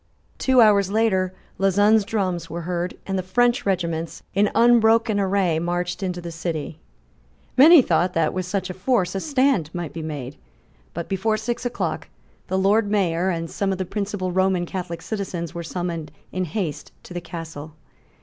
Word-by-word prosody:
Two 260 -2 +4
hours 200 -3 +5
later 195 -4 +1 0.3
Lauzun's 205 +3 +4
drums 185 -6 -2
were 170 +2 -5
heard; 175 +1 -3
and 195 -1 -1
the - - 0
French 240 +6 +1
regiments, 170 -4 -2
in 205 +1 +3
unbroken 230 -2 +4
array, 190 -4 +1
marched 175 +2 -2
into 180 -2 -2
the 170 -1 -7
city, 160 -2 -4 0.8
Many 305 +2 +8
thought 180 -4 +1
that, 165 -2 +1
with 185 -1 -3
such 185 0 -2
a - - -6
force, 190 -2 0
a 195 - -1
stand 265 - +1
might 175 -3 -4
still 165 - -6
be 155 - -5
made. 145 -3 -6 0.6
But, 170 0 -4
before 215 +3 0
six 240 +3 -2
o'clock, 240 - -3 0.4
the 190 - -1
Lord 205 +2 +3
Mayor 185 -3 +1
and 165 -2 -2
some 195 +3 -2
of 190 - -1
the 185 - -2
principal 200 -1 -3
Roman 185 -1 +1
Catholic 175 -2 -5
citizens 185 -6 -4
were 170 - -5
summoned 170 -2 -4 0.2
in 185 0 -2
haste 170 -3 -4
to - - -11
the 175 - -4
Castle. 160 -2 -8
185 Hz, 175 wpm, -23 LUFS, 170-205 Hz, 0.8 s, Many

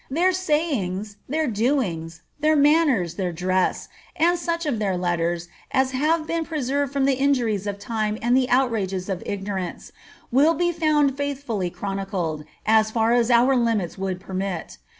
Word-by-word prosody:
Their 345 +7 +2
sayings, 265 - -1
their 315 +3 0
doings, 205 - -1 0.2
their 310 +1 +3
manners, 285 - +3
their 185 -3 -1
dress, 185 +2 0 0.3
and 345 +2 +3
soch 335 -1 -2
of 265 -7 -1
their 195 -3 0
letters 175 -1 -1 0.2
as 265 0 +1
have 310 +5 +1
been 330 0 -1
preserved 285 -3 -1
from 280 -1 +1
the 275 - +3
injuries 245 -7 +1
of 200 -1 -3
time 215 0 -2
and 240 +2 +2
the 255 -1 +2
outrages 210 -8 0
of 185 -2 -2
ignorance, 195 -3 -4 0.4
will 295 +7 +4
be 345 +3 +1
found 305 -4 +2
faithfully 275 -9 -2
chronicled, 190 -5 -3 0.2
as 220 0 +4
far 225 +1 +2
as 240 -1 +3
our 245 +2 +5
limits 225 -8 0
would 190 -1 -3
permit. 190 - -5
235 Hz, 155 wpm, -23 LUFS, 190-285 Hz, 0.4 s, our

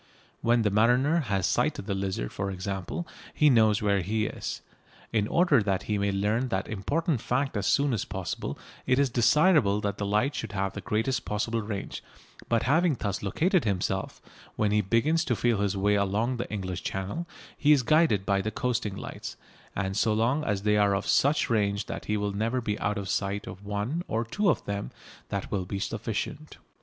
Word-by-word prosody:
When 120 0 +3
the 105 - +2
mariner 125 +10 +3
has 100 - 0
sighted - - 0
the 100 - -2
Lizard, 95 -11 -2
for 100 - -2
example, 95 - -4 0.3
he 150 -1 +5
knows 110 -4 +4
where 100 -2 +2
he 110 +4 0
is. - - -5 0.5
In 105 -2 +2
order 165 -6 +4
that 100 -2 0
he 105 -1 -1
may 100 0 +1
learn 105 +6 0
that 95 -5 -2
important 140 - -1
fact 130 +2 -1
as 100 -1 -1
soon 140 -2 +3
as 110 - -1
possible 95 -2 -4 0.3
it 130 0 +3
is 140 -2 +2
desirable 125 - +4
that 100 -1 -2
that 100 - -1
light 105 +8 +1
should 100 - -5
have 95 -1 -1
the - - -6
greatest 115 +3 -1
possible 115 +2 -1
range, 105 -2 -5 0.5
but 115 -1 +2
having 160 +3 +3
thus 100 -2 -2
located 170 - +1
himself, 95 -2 -1 0.4
when 105 -1 +1
he 105 0 +3
begins 125 - +2
to 120 - +1
feel 115 -2 +1
his 100 -1 0
way 100 +2 +2
along 105 +5 +1
the 120 - -4
English 95 -4 -3
Channel 100 - -4 0.3
he 150 - +3
is 140 -4 +5
guided 140 - +3
by 100 0 +2
the 110 - -2
coasting 115 -4 -2
lights, - - -7 0.4
and 95 0 -2
so 110 +1 +2
long 125 +7 +1
as 100 -7 -1
they 105 0 +3
are 100 -1 +3
of 100 - -2
such 145 +2 +3
range 100 -2 +1
that - - -6
he 105 - 0
will 100 -1 -1
never 115 +5 0
be 105 -3 -2
out 105 +1 -1
of 100 -1 -4
sight 100 +1 -1
of 95 - -9
one 105 +11 -2
or 115 +2 -1
two 200 - +1
of - - 0
them 100 0 -3 0.4
that - - -4
will 95 -2 -1
be 100 - -3
sufficient. 95 - -4
105 Hz, 200 wpm, -28 LUFS, 100-125 Hz, 0.5 s, he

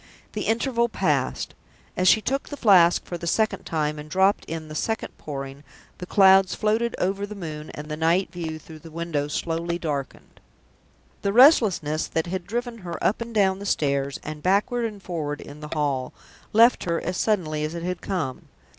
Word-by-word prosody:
The 210 - -3
interval 235 +1 +1
passed. - - -1 0.4
As 185 - +1
she 220 - +6
took 275 +5 -2
the 290 - -6
Flask 180 -8 +5
for 175 - -6
the 170 - -5
second 220 +5 0
time, 150 -2 -1
and 150 +1 -9
dropped 190 +4 +2
in 160 -1 -6
the 155 - -8
second 220 +8 -3
Pouring, 140 -1 -7 0.4
the 180 - -7
clouds 190 -1 +5
floated 225 +2 0
over 195 +2 -1
the 210 - -8
moon, 155 -5 -7
and 150 +1 -7
the 150 - -4
night 165 +4 +1
view 165 -3 -5
through 155 0 -12
the 165 - -12
window 160 -3 -2
slowly 165 +3 -2
darkened. 145 -5 -5 0.8
The 200 - 0
restlessness 205 - +5
that 160 - -1
had 180 +1 -4
driven 240 +2 -3
her 175 -3 -6
up 215 - +1
and 230 0 -5
down 195 -3 +2
the 200 - -7
stairs, 140 -4 0
and 155 0 -6
backward 210 - +1
and 210 -3 -6
forward 150 -5 -3
in 145 +1 -10
the 150 0 -8
hall, 140 -4 -1 0.4
left 230 +3 +5
her 170 -1 0
as 180 +2 -3
suddenly 165 -8 0
as 155 +2 -3
it 170 - -5
had 180 0 -3
come. 160 -10 -3
175 Hz, 190 wpm, -24 LUFS, 155-205 Hz, 0.8 s, she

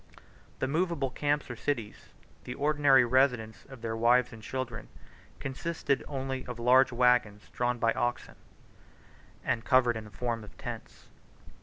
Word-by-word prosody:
The 130 - -1
movable 155 -3 0
camps 145 +2 0
or - - -5
cities, 115 -3 -4 0.3
the - - -6
ordinary 145 -3 +4
residence 125 -3 +1
of 130 -4 -13
their 115 -1 -2
wives 120 +2 +3
and 115 - -11
children, 125 0 -5 0.5
consisted 140 0 -2
only 135 -2 -4
of 125 -1 -6
large 125 +3 +5
wagons 120 -4 +2
drawn 120 0 0
by 115 0 +2
oxen, 120 0 -2 1.1
and 115 - 0
covered 130 -3 +4
in 110 -1 -6
the - - -11
form 115 +1 -3
of 105 - -14
tents. - - -8
125 Hz, 145 wpm, -29 LUFS, 115-135 Hz, 1.1 s, large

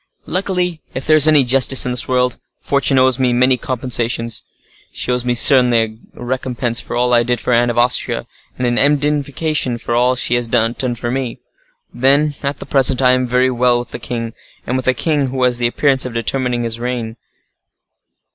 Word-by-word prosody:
Luckily, 180 -2 -2
if 130 - -4
there 155 - +4
is 155 0 +6
any 150 -3 +5
justice 130 +1 +3
in 125 - -2
this 125 - 0
world, 125 -1 0 0.2
fortune 140 -1 0
owes 130 0 +3
me 125 -2 +1
many 125 +2 +3
compensations. 120 -2 -2 0.5
She - - -3
owes 125 -1 0
me 125 -1 -1
certainly 120 -4 +3 0.2
a - - -10
recompense 125 -2 -2
for - - -7
all 125 0 +1
I 120 - +5
did 120 +1 -1
for 125 - -1
Anne 120 +1 +2
of 120 - -3
Austria, 120 +1 +1 0.3
and 125 - -2
an 120 0 +1
indemnification 145 -2 0
for 120 - -4
all 125 +1 +2
she 125 - 0
has 120 -1 -1
not 115 -1 0
done 125 -2 -1
for 120 0 -4
me. 130 -2 -3 0.6
Then, 140 +4 +2
at 140 +1 -3
the - - -9
present, 135 -2 +2
I 130 -1 +4
am 130 0 +1
very 125 +1 +1
well 125 0 +2
with 120 0 -7
a - - -6
king, 115 -2 -5 0.3
and 125 - -2
with 130 -1 -3
a 130 - +2
king 145 -1 0
who 130 0 -3
has 125 -1 +1
the 120 - +2
appearance 135 +2 +1
of 125 -2 -6
determining 120 0 -1
to 115 +1 -4
reign. 120 -2 -4
125 Hz, 205 wpm, -16 LUFS, 120-135 Hz, 0.6 s, is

